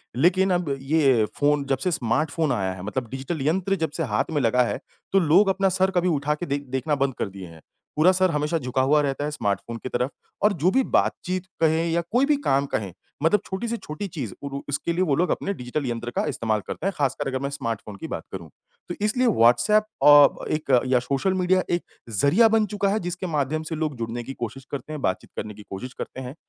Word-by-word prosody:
लेकिन 185 Hz, +7 st, +3 dB
अब 170 Hz, -6 st, 0 dB
ये 135 Hz, -6 st, +3 dB
फ़ोन 145 Hz, -1 st, +2 dB
जब 135 Hz, -, +2 dB
से 175 Hz, +7 st, -1 dB
स्मार्टफ़ोन 150 Hz, +4 st, 0 dB
आया 95 Hz, -2 st, 0 dB
है 90 Hz, -, -9 dB
मतलब 115 Hz, +3 st, -3 dB
डिजिटल 135 Hz, +3 st, -4 dB
यंत्र 190 Hz, +4 st, +1 dB
जब -, -, -6 dB
से -, -, 0 dB
हाथ -, -, 0 dB
में 145 Hz, -3 st, +1 dB
लगा 125 Hz, +1 st, +3 dB
है, -, -, -2 dB, 0.3 s
तो 195 Hz, -, +5 dB
लोग 180 Hz, +5 st, +4 dB
अपना 195 Hz, 0 st, +2 dB
सर 190 Hz, +1 st, +1 dB
कभी 180 Hz, +1 st, +2 dB
उठा 150 Hz, -1 st, 0 dB
के 175 Hz, -, -5 dB
देख 140 Hz, -1 st, -2 dB
देखना 150 Hz, +2 st, 0 dB
बंद 135 Hz, -1 st, 0 dB
कर -, -, -1 dB
दिए 95 Hz, -1 st, -9 dB
हैं, 80 Hz, -1 st, -14 dB, 0.3 s
पूरा 160 Hz, +5 st, +5 dB
सर 185 Hz, -1 st, +2 dB
हमेशा 150 Hz, +2 st, 0 dB
झुका 130 Hz, -2 st, -1 dB
हुआ 150 Hz, +3 st, +4 dB
रहता 140 Hz, 0 st, -1 dB
है 150 Hz, -, -2 dB
स्मार्टफ़ोन 115 Hz, -3 st, -2 dB
की -, -, -4 dB
तरफ़ 125 Hz, +2 st, -1 dB, 0.3 s
और 210 Hz, 0 st, +5 dB
जो 175 Hz, +2 st, +1 dB
भी 265 Hz, +3 st, +3 dB
बातचीत 185 Hz, -4 st, 0 dB, 0.2 s
कहें 160 Hz, +1 st, +3 dB
या 170 Hz, +1 st, +2 dB
कोई 250 Hz, +4 st, +4 dB
भी 295 Hz, 0 st, +3 dB
काम 135 Hz, +1 st, +3 dB
कहें 100 Hz, -4 st, -3 dB, 0.3 s
मतलब 205 Hz, +6 st, +4 dB
छोटी 190 Hz, +5 st, -4 dB
से 235 Hz, 0 st, -2 dB
छोटी 155 Hz, +4 st, -6 dB
चीज़ 140 Hz, -, -5 dB
उर 140 Hz, -, -5 dB, 0.2 s
उसके 150 Hz, +4 st, -1 dB
लिए 175 Hz, -, 0 dB
वो 145 Hz, -6 st, +2 dB
लोग 175 Hz, +5 st, +1 dB
अपने 200 Hz, -, -1 dB
डिजिटल 130 Hz, 0 st, -4 dB
यंत्र 120 Hz, 0 st, -3 dB
का -, -, +1 dB
इस्तेमाल 110 Hz, -2 st, -1 dB
करते -, -, -5 dB
हैं, 195 Hz, -, -1 dB
ख़ासकर 135 Hz, -2 st, 0 dB
अगर 130 Hz, -1 st, -2 dB
मैं 140 Hz, -, -2 dB
स्मार्टफ़ोन 115 Hz, -6 st, -4 dB
की -, -, -6 dB
बात -, -, -5 dB
करूँ। -, -, -7 dB, 0.4 s
तो 175 Hz, -, -3 dB
इसलिए 250 Hz, +4 st, +2 dB
व्हाट्सऐप 210 Hz, -, +4 dB, 0.2 s
अ, 145 Hz, -1 st, +7 dB
एक 155 Hz, -2 st, -2 dB, 0.2 s
या 125 Hz, -1 st, +3 dB
सोशल 140 Hz, +9 st, 0 dB
मीडिया 185 Hz, 0 st, +2 dB
एक 175 Hz, -, -4 dB, 0.3 s
ज़रिया 145 Hz, -, +4 dB
बन 220 Hz, -1 st, +3 dB
चुका 200 Hz, -1 st, +1 dB
है 210 Hz, -, +1 dB
जिसके 180 Hz, 0 st, -4 dB
माध्यम 155 Hz, 0 st, -1 dB
से 160 Hz, -, -2 dB
लोग 155 Hz, -2 st, -2 dB
जुड़ने 115 Hz, +1 st, -4 dB
की 135 Hz, +3 st, -7 dB
कोशिश 125 Hz, +2 st, -6 dB
करते 140 Hz, +2 st, -5 dB
हैं, 150 Hz, -, -5 dB
बातचीत 95 Hz, -, -2 dB
करने 105 Hz, 0 st, -4 dB
की 105 Hz, 0 st, -12 dB
कोशिश 125 Hz, +7 st, -6 dB
करते 130 Hz, -, -7 dB
हैं 130 Hz, +2 st, -7 dB
150 Hz, 235 wpm, -24 LUFS, 125-180 Hz, 0.4 s, अ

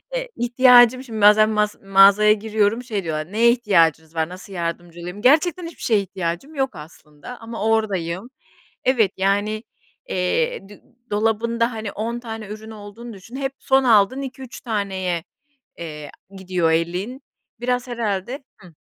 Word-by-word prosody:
Eee, -, -, -3 dB
ihtiyacım 245 Hz, +1 st, +5 dB
şimdi 220 Hz, -4 st, -6 dB
bazen 210 Hz, +1 st, +6 dB
mas 210 Hz, -1 st, 0 dB
mağazaya 195 Hz, +2 st, +6 dB
giriyorum, 220 Hz, +2 st, 0 dB
şey 215 Hz, -6 st, -3 dB
diyorlar, 155 Hz, +2 st, -4 dB
"Neye 235 Hz, +2 st, +5 dB
ihtiyacınız 165 Hz, -9 st, +2 dB
var, 160 Hz, +1 st, -1 dB
nasıl 185 Hz, +2 st, -11 dB
yardımcı 170 Hz, 0 st, -5 dB
olayım?" 180 Hz, +4 st, -7 dB
Gerçekten 315 Hz, +6 st, +3 dB
hiçbir 335 Hz, -, -13 dB
şeye 220 Hz, -3 st, +3 dB
ihtiyacım 185 Hz, -, -5 dB
yok 265 Hz, -5 st, -1 dB
aslında 150 Hz, +7 st, -12 dB
ama 225 Hz, -2 st, -6 dB
oradayım. 200 Hz, -3 st, -1 dB, 0.5 s
Evet, 230 Hz, -7 st, +2 dB
yani, 205 Hz, +3 st, 0 dB, 0.5 s
eee, 195 Hz, -, -1 dB
d 205 Hz, -, -15 dB, 0.3 s
dolabında 230 Hz, +3 st, 0 dB
hani 220 Hz, -2 st, -5 dB
10 230 Hz, +3 st, -4 dB
tane 225 Hz, -3 st, -7 dB
ürün 215 Hz, +2 st, -9 dB
olduğunu 215 Hz, +3 st, -10 dB
düşün, 200 Hz, +5 st, -12 dB
hep 270 Hz, 0 st, -2 dB
son 265 Hz, 0 st, +2 dB
aldığın 230 Hz, +3 st, +4 dB
2-3 265 Hz, -2 st, -8 dB
taneye, 190 Hz, -6 st, -2 dB, 0.5 s
eee, 150 Hz, -3 st, -8 dB, 0.3 s
gidiyor 180 Hz, -3 st, 0 dB
elin, 180 Hz, -, -2 dB, 0.4 s
biraz 250 Hz, +1 st, -1 dB
herhâlde 235 Hz, +3 st, -3 dB
Hı 180 Hz, -3 st, -17 dB
215 Hz, 145 wpm, -21 LUFS, 185-240 Hz, 0.5 s, bazen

